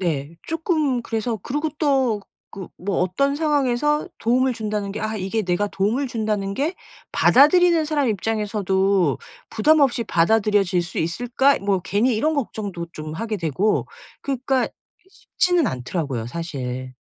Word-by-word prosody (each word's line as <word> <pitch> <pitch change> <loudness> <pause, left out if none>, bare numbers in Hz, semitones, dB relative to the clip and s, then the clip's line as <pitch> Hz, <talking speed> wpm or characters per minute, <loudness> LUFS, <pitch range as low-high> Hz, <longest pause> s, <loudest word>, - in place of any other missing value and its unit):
네 160 -3 -2
쪼끔 310 -6 0
그래서 225 0 -2
그리고 295 +4 -2
또 265 -8 +2 0.3
그 190 -2 -8
뭐 195 +1 -1
어떤 275 +11 +1
상황에서 295 -1 +1
도움을 250 +2 +2
준다는 210 -2 -3
게 215 - -5
'아 215 0 -2
이게 205 +3 -2
내가 185 +2 0
도움을 210 +8 0
준다는 210 -4 -2
게 300 - -1 0.4
받아들이는 330 +4 +5
사람 295 -4 0
입장에서도 200 - +1 0.3
부담 305 +8 +3
없이 255 -4 +3
받아들여질 200 0 +2
수 175 - -9
있을까?' 245 +11 +1
뭐 195 -1 0
괜히 205 +7 +1
이런 305 +8 +1
걱정도 205 -10 -4
좀 155 0 -7
하게 220 +5 -3
되고 175 +5 0 0.4
그러니까 265 -1 0 0.4
쉽지는 355 -5 0
않더라고요 130 - -3
사실. 130 -4 -5
215 Hz, 315 characters per minute, -22 LUFS, 185-270 Hz, 0.4 s, 받아들이는